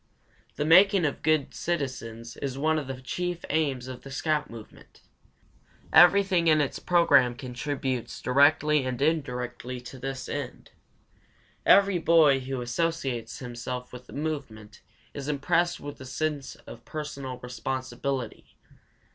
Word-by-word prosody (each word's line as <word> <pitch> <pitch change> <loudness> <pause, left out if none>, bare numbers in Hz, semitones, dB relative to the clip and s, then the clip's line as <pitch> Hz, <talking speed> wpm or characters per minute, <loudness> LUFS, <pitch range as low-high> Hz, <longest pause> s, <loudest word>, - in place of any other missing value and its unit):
The 150 - -1
making 185 +2 +6
of 145 - -2
good 155 -2 +1
citizens 125 -8 -4
is 135 -2 -4
one 155 +2 +1
of 145 - -7
the 135 -1 -6
chief 175 +6 -4
aims 140 -5 0
of 130 -1 -8
the 135 - -11
scout 150 +2 -1
movement. 115 -2 -13 0.9
Everything 180 -1 +6
in 155 -1 +5
its 145 -3 -1
program 140 -9 +4
contributes 130 0 -4
directly 145 +2 +3
and 130 -1 -3
indirectly 125 -4 -2
to 125 +2 -10
this 135 0 -5
end. - - -6 1.0
Every 200 -2 +6
boy 160 -5 +5
who 130 0 -4
associates 125 -3 -2
himself 125 0 -6
with 125 0 -10
the - - -13
movement 135 -9 -5 0.3
is 140 -1 -6
impressed 170 +4 +1
with 145 -2 -8
a - - -8
sense 145 +2 -3
of 115 - -11
personal 140 -4 -6
responsibility. 130 0 -5
140 Hz, 130 wpm, -27 LUFS, 125-155 Hz, 1.0 s, making